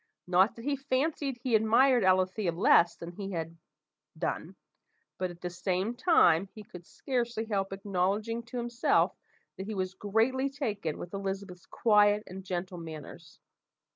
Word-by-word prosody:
Not 185 +4 +3
that 230 - -10
he 285 -1 0
fancied 275 0 -1
he 255 -3 -1
admired 230 +3 +4
Alethea 185 0 +2
less 170 -1 +4
than 170 0 -8
he 195 +2 -6
had 165 -1 -4 0.6
done; 165 +3 -3 0.6
but, 185 -1 -1
at 175 0 -12
the 180 - -4
same 185 +5 -1
time, 200 - +4
he 215 - -9
could 180 -3 -13
scarcely 240 -4 -2
help 195 -3 -1
acknowledging 200 +4 -1
to 250 +1 -6
himself 240 0 +1 0.4
that 190 - -6
he 215 - -4
was 185 -1 -2
greatly 225 +7 +1
taken 210 - -3
with 175 - -8
Elizabeth's 195 -2 -5
quiet 210 -1 +3
and 190 +1 -9
gentle 180 -1 -4
manners. 160 0 -10
195 Hz, 150 wpm, -30 LUFS, 180-235 Hz, 0.6 s, admired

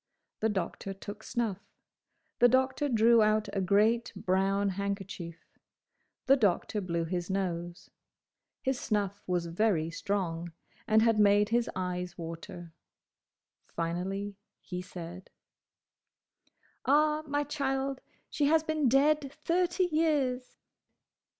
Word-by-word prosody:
The 220 - +1
Doctor 195 0 -3
took 205 +2 -8
snuff. 220 -5 -2 0.8
The 245 - +7
Doctor 260 +3 +2
drew 230 -1 +5
out 215 0 +2
a 195 - 0
great, 215 +5 +2
brown 195 +2 +1
handkerchief. 195 -3 -5 0.8
The 270 - +6
Doctor 210 -2 +1
blew 170 -3 -1
his 175 +1 -3
nose. 175 -3 -3 0.7
His 260 -1 0
snuff 205 -2 -1
was 175 -2 0
very 170 -2 +1
strong, 170 -3 -3 0.3
and 220 0 +5
had 225 -2 +3
made 205 0 +5
his 235 +1 +1
eyes 180 -1 -3
water. 165 0 -8 0.9
Finally 190 +4 -3 0.2
he 180 -2 -6
said, 180 0 -9 1.5
"Ah, 300 +2 +3
my 290 +1 0
child, 270 -2 -2 0.3
she 290 - +1
has 315 +1 +4
been 310 -4 +1
dead 280 +2 +3
thirty 355 +2 +2
years!" 285 -6 0
205 Hz, 110 wpm, -30 LUFS, 180-260 Hz, 1.5 s, The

